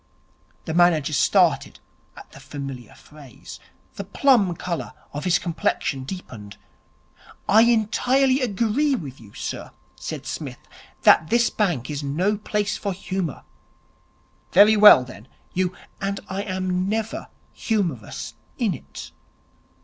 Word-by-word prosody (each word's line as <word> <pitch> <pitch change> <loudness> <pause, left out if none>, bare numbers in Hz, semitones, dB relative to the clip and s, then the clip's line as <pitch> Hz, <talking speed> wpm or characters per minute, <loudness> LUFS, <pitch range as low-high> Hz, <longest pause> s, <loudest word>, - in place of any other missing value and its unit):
The 160 - -3
manager 165 -4 +3
started 135 - +2 0.4
at - - -13
the - - -13
familiar 135 -5 -8
phrase. 145 -5 -13 0.4
The 200 - -4
plum 205 -3 +3
colour 170 0 -4 0.2
of 145 +4 -5
his 180 -1 +4
complexion 160 -5 -2
deepened. 115 - -9 0.9
'I 220 +2 +6
entirely 245 +4 +2
agree 240 +5 +1
with 135 - -8
you, 105 -3 -16
sir,' - - -5 0.3
said - - -7
Psmith, - - -5 0.5
'that 155 - +6
this 235 0 +3
bank 165 - -1
is 145 0 -4
no 170 +9 0
place 210 -1 -2
for 200 -2 -3
humour.' 185 -3 -4 1.1
'Very 210 +4 +7
well, 210 -11 +9
then. 125 -2 -12 0.3
You 180 -1 0 0.2
' - - -34
'And 195 0 -2
I 190 +1 -3
am 185 -1 -2
never 220 +1 -3 0.3
humorous 175 - -3 0.2
in - - +1
it. 70 +1 -10
185 Hz, 125 wpm, -23 LUFS, 145-210 Hz, 1.1 s, well